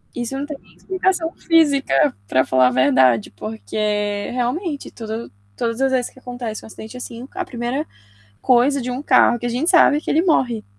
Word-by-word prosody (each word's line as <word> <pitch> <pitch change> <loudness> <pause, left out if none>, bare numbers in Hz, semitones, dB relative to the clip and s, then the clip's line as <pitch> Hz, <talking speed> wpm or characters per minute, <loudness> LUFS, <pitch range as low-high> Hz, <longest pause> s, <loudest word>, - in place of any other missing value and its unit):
Isso 245 +2 -4
não 280 - -3
tem 295 -1 -7
nem - - -24
explicação 375 -3 -1
física, 285 - +2
para 130 +4 +2
falar 130 -1 +4
a - - +1
verdade, 130 -3 +3
porque, 205 - -3
realmente, 280 +6 -2
tudo 225 0 -6 0.3
todas 230 0 -2
as 270 0 +2
vezes 255 -2 0
que - - -18
acontece 245 -3 -6
um - - -11
acidente 220 +2 -10
assim, 240 0 -8
a 370 0 -3
1º 245 +2 -3 0.6
coisa 260 +3 +3
de 250 - -4
um 250 +2 -4
carro 255 -3 +4
que 240 - -6
a - - 0
gente 255 +8 0
sabe 335 -4 +6
é - - -3
que - - -6
ele 320 - +3
morre. 255 - +1
245 Hz, 195 wpm, -20 LUFS, 210-285 Hz, 0.6 s, sabe